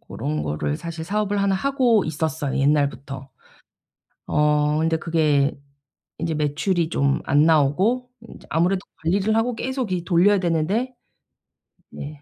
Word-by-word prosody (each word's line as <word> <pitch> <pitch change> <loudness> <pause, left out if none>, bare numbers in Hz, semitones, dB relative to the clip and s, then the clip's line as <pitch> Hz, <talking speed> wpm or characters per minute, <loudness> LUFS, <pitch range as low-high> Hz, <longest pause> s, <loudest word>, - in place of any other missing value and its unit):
고런 75 0 -4
거를 75 0 -2
사실 165 -1 -6
사업을 205 +2 -1
하나 200 -1 +2
하고 245 -2 +2
있었어요 155 -2 -2
옛날부터. 140 -1 0 1.0
어 150 0 +2
근데 160 0 +1
그게 155 -4 +1 0.6
인제 165 0 -2
매출이 160 +3 0
좀 140 -3 +1
안 145 +2 +3
나오고 180 - +2
인제 230 - -14
아무래도 180 +4 +1 0.2
관리를 200 +6 +1
하고 235 +2 +1
계속 255 -3 -3
이 175 -2 -2
돌려야 190 +3 +4
되는데 185 +9 0 1.0
네 145 0 -9
165 Hz, 280 characters per minute, -22 LUFS, 145-200 Hz, 1.0 s, 돌려야